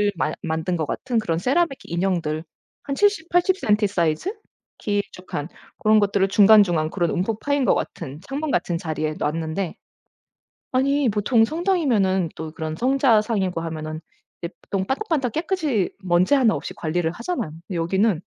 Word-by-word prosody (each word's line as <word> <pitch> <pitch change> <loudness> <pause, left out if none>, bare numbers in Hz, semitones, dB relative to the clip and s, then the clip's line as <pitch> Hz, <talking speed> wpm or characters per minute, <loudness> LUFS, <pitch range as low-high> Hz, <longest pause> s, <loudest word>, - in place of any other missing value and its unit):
마 155 - 0
만든 160 +2 -2
것 160 - -1
같은 240 - -1
그런 170 -7 -1
세라믹 270 - +1
인형들 170 -3 -1 0.4
한 280 - -3
70 405 -2 +2
80 355 +2 +2
센티 210 - +2
사이즈 175 - 0 0.4
길쭉한 195 -6 -3 0.3
고런 215 0 +4
것들을 200 -1 +2
중간중간 195 -6 +5
그런 175 -1 0
움푹 210 +4 -1
파인 285 -2 +1
것 - - +4
같은 150 -2 -5
창문 280 - -4
같은 175 -1 0
자리에 155 -3 -3
놓았는데 160 +4 -2 1.0
아니 275 +2 +2
보통 220 +2 +3
성당이면은 245 - +1
또 160 0 -6
그런 155 0 -5
성자상이고 220 - +2
하면은 155 -1 -5 0.4
이제 170 - -4
보통 190 -1 -2
반짝반짝 275 - -1
깨끗이 310 - 0
먼지 180 +6 +3
1 255 -6 +4
없이 - - -5
관리를 165 0 -1
하잖아요. 235 - -4
근데 170 +4 -9
여기는 190 +2 +1
195 Hz, 325 characters per minute, -23 LUFS, 165-260 Hz, 1.0 s, 중간중간